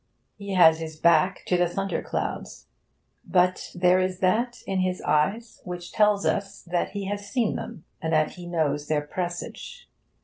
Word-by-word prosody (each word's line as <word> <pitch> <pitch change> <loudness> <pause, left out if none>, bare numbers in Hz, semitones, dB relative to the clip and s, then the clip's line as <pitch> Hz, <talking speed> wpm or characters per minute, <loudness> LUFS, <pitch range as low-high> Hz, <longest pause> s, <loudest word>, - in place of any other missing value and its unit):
He 200 -2 -5
has 160 -3 +6
his 160 -1 -6
back 170 +3 +3
to 180 - +2
the 175 0 +3
thunderclouds, 195 +2 -3 0.6
but 180 0 +1
there 180 +1 +4
is 185 0 -1
that 225 +7 0
in 195 -1 -1
his 185 0 0
eyes 195 +10 0
which 175 -1 -7
tells 210 -2 +3
us 200 0 -1
that 175 +1 -2
he 200 -1 -4
has 200 +1 -4
seen 235 -3 0
them, 165 - -7 0.2
and 160 - -2
that 155 -1 +2
he 175 -1 -10
knows 150 -4 -1
their 150 -1 +1
presage. 175 - -6
180 Hz, 165 wpm, -26 LUFS, 170-200 Hz, 0.6 s, has